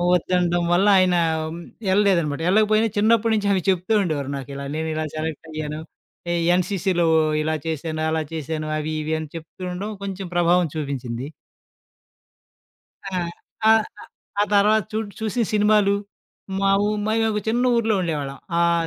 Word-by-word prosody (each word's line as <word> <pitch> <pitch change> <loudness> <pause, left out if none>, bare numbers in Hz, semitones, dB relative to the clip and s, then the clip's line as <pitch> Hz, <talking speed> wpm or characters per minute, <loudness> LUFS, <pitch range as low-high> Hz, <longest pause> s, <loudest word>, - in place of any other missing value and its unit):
ఒద్దనడం 175 0 +1
వల్ల, 190 +4 +3
ఆయనా 180 -1 +3 0.7
యెళ్ళలేదనమాట. 185 -7 +2
యెళ్ళకపోయినా 215 +3 +4
చిన్నప్పుడు 225 +1 +3
నుంచి 205 -1 0
అవి 190 -2 +2
చెప్తూ 185 +3 +1
ఉండేవారు 145 -6 -2
నాకిలా, 140 +1 -7
నేనిలా 155 0 -2
సెలెక్టయ్యాను 155 -1 -4 0.5
ఎ - - +1 0.2
ఎన్‌సీసీలో 180 -1 0 0.4
ఇలా 155 +1 0
చేశాను, 160 0 -3
అలా 160 0 0
చేశాను, 155 0 -3
అవీ, 155 +1 -3
ఇవీ 155 +1 -2
అని 155 -1 -6
చెప్తూండడం 180 +4 -6
కొంచుం 195 -1 -5
ప్రభావం 175 0 +3
చూపించింది. 130 -5 -4 1.8
ఆ! - - -6 0.6
ఆహ్, 220 0 +6 0.2
ఆహ్, - - -12 0.3
ఆ - - +5
తర్వాత 210 +2 +4
చూట్ 215 -1 -2
చూసిన 220 +2 0
సినిమాలు, 210 -1 +4 0.7
మావు 195 +1 +3 0.2
మయ్యొక 220 -1 +1
చిన్న 240 +3 +1
ఊరులో 225 -2 +2
ఉండేవాళ్ళం. 145 -5 -3 0.2
ఆహ్, 170 -1 +2
180 Hz, 125 wpm, -23 LUFS, 155-205 Hz, 1.8 s, ఆహ్